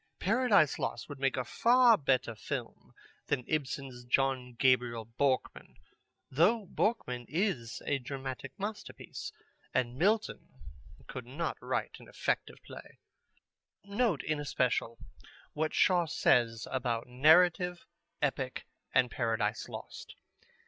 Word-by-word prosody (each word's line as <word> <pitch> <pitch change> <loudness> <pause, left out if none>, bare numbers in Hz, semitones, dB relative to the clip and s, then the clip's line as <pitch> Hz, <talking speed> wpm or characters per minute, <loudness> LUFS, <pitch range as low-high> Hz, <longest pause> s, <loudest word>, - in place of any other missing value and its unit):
Paradise 210 - +3
Lost - - -3
would 145 -3 -8
make 135 -1 +1
a 130 - -1
far 240 - +5
better 130 - +1
film 110 - -6 0.4
than 125 - -1
Ibsen's 135 -4 -3
John 125 0 0
Gabriel 120 -3 +2
Borkman, 130 +4 -1 0.6
though 190 - +3
Borkman 125 - -1
is 150 - -2
a 145 - 0
dramatic 135 0 -6
masterpiece, 205 +2 -6 0.4
and 125 -1 +1
Milton 210 +5 +1 0.6
could - - -7
not - - -3
write - - -3
an - - -14
effective - - -2
play." - - -12 0.9
Note 200 - 0
in 155 -1 -1
especial 125 -4 0 0.6
what 155 +1 -1
Shaw 175 -3 +3
says 120 -7 +2
about 120 -3 -1
narrative, 175 +7 +4 0.4
epic, - - -1 0.3
and 125 -2 +4
Paradise 115 -2 -1
Lost. - - -9
135 Hz, 115 wpm, -31 LUFS, 125-180 Hz, 0.9 s, far